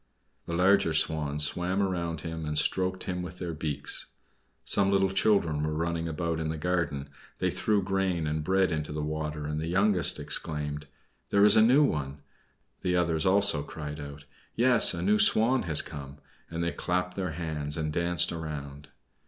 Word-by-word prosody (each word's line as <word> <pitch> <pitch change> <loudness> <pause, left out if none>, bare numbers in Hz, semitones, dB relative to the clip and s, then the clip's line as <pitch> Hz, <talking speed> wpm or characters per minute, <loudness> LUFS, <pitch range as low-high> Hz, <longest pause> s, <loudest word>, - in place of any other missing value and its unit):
The 85 - -4
larger 90 -2 +3
Swans 75 -2 +1
swam 90 +5 -1
round 85 -4 -3
him, 80 0 -6
and 75 -1 -3
stroked 95 +3 0
him 90 -1 -4
with 90 0 -8
their 90 -2 -5
beaks. 75 -3 -4 0.6
Some 100 -1 +2
little 95 -1 +2
children 95 -7 +1
were 75 0 -2
running 85 +1 -2
about 80 +1 -3
in 80 -1 -3
the 80 - -3
garden; 80 -4 -2 0.3
they - - -1
threw 105 -2 0
grain 95 -3 -1
and 75 0 -2
bread 95 +2 +1
into 75 -2 -3
the 75 0 -4
water, 75 -1 -4
and 75 +1 -3
the 80 - -4
youngest 90 -2 +3
exclaimed: 75 -1 -3 0.4
"There 100 0 +4
is 105 - +6
a 110 - +6
new 130 +7 +5
one!" 70 - -2 0.6
The 90 0 0
others 85 -2 +1
also 100 -5 +3
cried 75 0 -7
out: 70 0 -9 0.3
"Yes, 120 -5 +6
a 85 - -4
new 105 +3 +2
Swan 125 +4 +4
has 80 - +4
come!" 70 0 -9 0.3
and 85 0 -4
they 85 - -1
clapped 90 0 -2
their 90 -4 -3
hands, 75 -3 -3
and 75 -1 -3
danced 85 0 +4
around. 75 -3 -7
85 Hz, 175 wpm, -28 LUFS, 75-95 Hz, 0.6 s, is